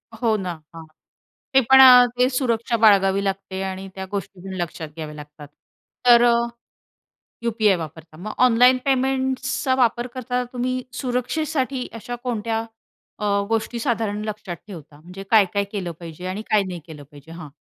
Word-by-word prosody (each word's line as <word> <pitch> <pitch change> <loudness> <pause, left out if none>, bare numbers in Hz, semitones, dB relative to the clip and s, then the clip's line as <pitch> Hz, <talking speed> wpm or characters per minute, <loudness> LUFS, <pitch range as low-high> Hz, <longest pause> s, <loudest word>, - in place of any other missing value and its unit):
हो 225 -1 +1
ना, 180 - -3 0.2
हां. 165 -1 -9 0.7
ते 265 - +6
पण 265 - +9
अ, 250 -1 +9
ते 250 +1 +4
सुरक्षा 235 -2 0
बाळगावी 195 -1 +4
लागते 195 -1 -3
आणि 190 0 -5
त्या 190 0 -6
गोष्टी 195 -2 -6
लक्षात 165 -2 -5
घ्याव्या 155 -1 -7
लागतात. 150 0 -12 0.6
तर 240 -1 +7
अ, 240 - +5 1.1
यु-पी-आय 215 -4 +2
वापरता. 160 0 -9
मग 215 +5 -6
ऑनलाईन 250 +2 +5
पेमेंट्सचा 265 0 0
वापर 240 -1 +1
करता 250 0 -2
तुम्ही 255 +1 -2 0.2
सुरक्षेसाठी 260 +1 -2
अशा 245 +2 -6
कोणत्या 225 -2 -2 0.6
अ, 210 - -3 0.2
गोष्टी 225 +1 -1
साधारण 220 -4 -1
लक्षात 210 -4 -5
ठेवता? 155 -6 -11
म्हणजे 180 +3 -10
काय-काय 200 -2 +4
केलं 185 -5 -4
पाहिजे 170 +1 -9
आणि 195 +3 -4
काय 210 -2 +3
नाही 175 -2 -6
केलं 150 -3 -11
पाहिजे? 145 +3 -14
हां. 165 -3 -9
215 Hz, 150 wpm, -22 LUFS, 180-250 Hz, 1.1 s, पण